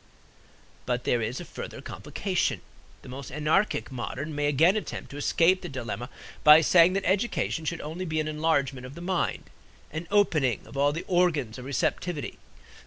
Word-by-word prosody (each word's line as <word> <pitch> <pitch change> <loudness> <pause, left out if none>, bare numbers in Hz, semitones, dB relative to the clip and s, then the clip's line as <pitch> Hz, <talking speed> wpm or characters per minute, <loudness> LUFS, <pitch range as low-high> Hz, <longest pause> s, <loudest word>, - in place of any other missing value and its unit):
But 125 0 -1
there 120 - +1
is 115 +3 -2
a - - -7
further - - -8
complication. - - -2 0.4
The - - -11
more 135 +2 -7
anarchic 150 +2 0
modern 130 +4 -5
may 145 0 0
again 160 +7 +4
attempt 215 - -5
to 140 - -8
escape 170 +5 +3
the 175 - -6
dilemma 120 -2 -5 0.3
by 150 +1 +9
saying 170 +2 +5
that 195 0 -1
education 190 -4 0
should 165 +1 -2
only 165 +5 -5
be 155 -2 -1
an 155 - -1
enlargement 145 -5 0
of 135 - -11
the 170 - -9
mind, 180 0 -2 0.4
an 160 +2 -5
opening 155 - +2
of - - -13
all 140 +1 +3
the 165 +4 -5
organs 155 -10 +1
of 125 - -8
receptivity. 145 +3 -2
155 Hz, 175 wpm, -27 LUFS, 135-175 Hz, 0.4 s, by